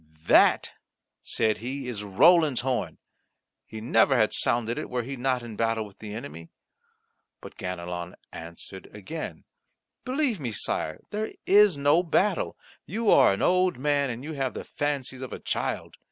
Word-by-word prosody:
"That," - - +5 0.5
said 110 -1 0
he, 130 +3 -5
"is 110 -4 -4
Roland's 145 - +4
horn; 130 0 -2 0.7
he 110 - -8
never 130 +3 +3
had 110 -2 +3
sounded 120 -1 0
it - - -6
were 125 -1 -2
he 135 +4 -5
not 125 -1 -1
in 115 -2 -8
battle 115 0 0
with 100 -2 -16
the 105 -1 -7
enemy." 85 -7 -8 0.9
But - - -11
Ganelon 90 -1 -5 0.2
answered 85 +3 -9
again: 155 - -7 0.6
"Believe 260 - 0
me, 120 -6 -4
Sire, 80 -5 -2
there 215 +1 -3
is 205 -4 +6
no 145 +4 +4
battle. 185 +2 0 0.3
You 220 +3 +1
are - - +7
an 100 - -1
old 185 0 +3
man, 140 0 +1
and 120 +1 -5
you 155 +2 -5
have 135 -3 -2
the - - -5
fancies 140 -3 -3
of 130 - -6
a - - -6
child. - - -3
125 Hz, 160 wpm, -26 LUFS, 110-155 Hz, 0.9 s, are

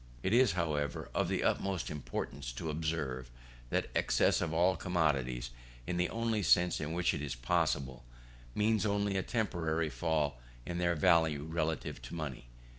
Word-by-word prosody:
It 95 - +1
is, 120 -4 +5
however, 75 -5 -1
of - - +1
the - - 0
utmost 95 -2 0
importance 70 -4 -4
to 80 +6 -3
observe 75 -5 -2 0.4
that - - -1
excess - - +3
of 85 -3 -1
all 90 +3 +3
commodities, 70 -10 0 0.3
in 90 - -2
the 90 - +1
only 115 -2 0
sense 90 -3 +4
in 75 +2 -3
which 85 +1 +2
it 75 - -3
is 70 -3 -3
possible, 65 +1 0 0.5
means 105 0 +2
only 100 -1 +1
a 95 - +2
temporary 80 -8 -1
fall 75 0 0 0.3
in 85 0 -3
their 85 -1 +2
value 80 -3 +3
relatively 80 -3 -2
to - - -8
money. 70 -7 -5
80 Hz, 160 wpm, -33 LUFS, 75-90 Hz, 0.5 s, is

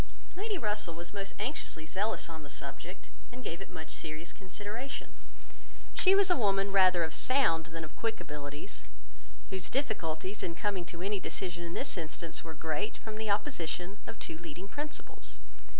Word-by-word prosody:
Lady 410 +2 0
Russell 210 - 0
was 170 +3 -5
most 195 -1 -3
anxiously 210 - -1
zealous 200 +7 +1
on 160 -1 -6
the 145 - -9
subject, 145 +6 -5 0.2
and 250 +1 -7
gave 170 -2 -2
it 195 - -6
much 160 -3 -6
serious 160 +1 -4
consideration. 205 +7 -4 0.8
She 385 0 +7
was 395 -2 +7
a - - +8
woman 195 -3 +4
rather 185 -3 +7
of 160 0 0
sound 165 -12 +4
than 165 0 -4
of 155 - -7
quick 225 -1 0
abilities, 145 +4 -4 0.7
whose 190 -2 +1
difficulties 205 - 0
in 170 - -1
coming 195 -3 +1
to 170 0 -5
any 200 +1 +2
decision 175 -2 -2
in 170 0 -3
this 265 -9 +1
instance 160 +1 -3
were 160 -1 -6
great, 160 +7 0
from 220 -1 -5
the 220 -1 0
opposition 200 - +1
of 225 - -5
two 160 - -4
leading 170 +3 -6
principles. 295 +7 -5
185 Hz, 170 wpm, -34 LUFS, 165-215 Hz, 0.8 s, a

